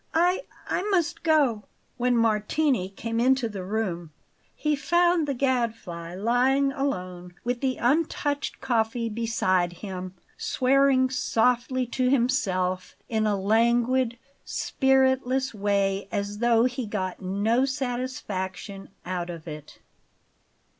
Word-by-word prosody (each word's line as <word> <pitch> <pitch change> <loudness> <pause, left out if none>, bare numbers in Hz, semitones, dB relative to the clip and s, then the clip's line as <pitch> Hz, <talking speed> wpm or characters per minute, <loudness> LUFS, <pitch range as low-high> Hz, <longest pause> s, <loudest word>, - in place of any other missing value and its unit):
I 360 +7 +2 0.2
I - - 0
must 345 -3 +1
go!" 285 -10 +2 0.3
When 245 -1 +2
Martini 225 0 +1
came 230 +3 -4
into 260 0 +3
the 200 -4 -6
room 185 -5 -3 0.5
he 300 -1 0
found 345 +2 +2
the 280 - -1
Gadfly 225 -10 -2
lying 255 +7 +2
alone 180 -11 -4
with 245 0 -2
the 260 -2 0
untouched 290 +1 0
coffee 230 -1 0
beside 210 -6 0
him, 185 0 -7 0.2
swearing 260 0 +3
softly 250 +1 +1
to 250 +1 0
himself 190 -9 0
in 220 -2 +1
a 205 -2 +1
languid, 235 +4 +2 0.3
spiritless 265 -1 +1
way, 200 -1 0
as 205 +1 -3
though 235 -1 +4
he 250 -2 -2
got 190 -3 -3
no 205 +7 +1
satisfaction 240 -7 -4 0.2
out 180 -1 -3
of 170 -1 -8
it. 150 -2 -9
235 Hz, 115 wpm, -26 LUFS, 195-265 Hz, 0.5 s, though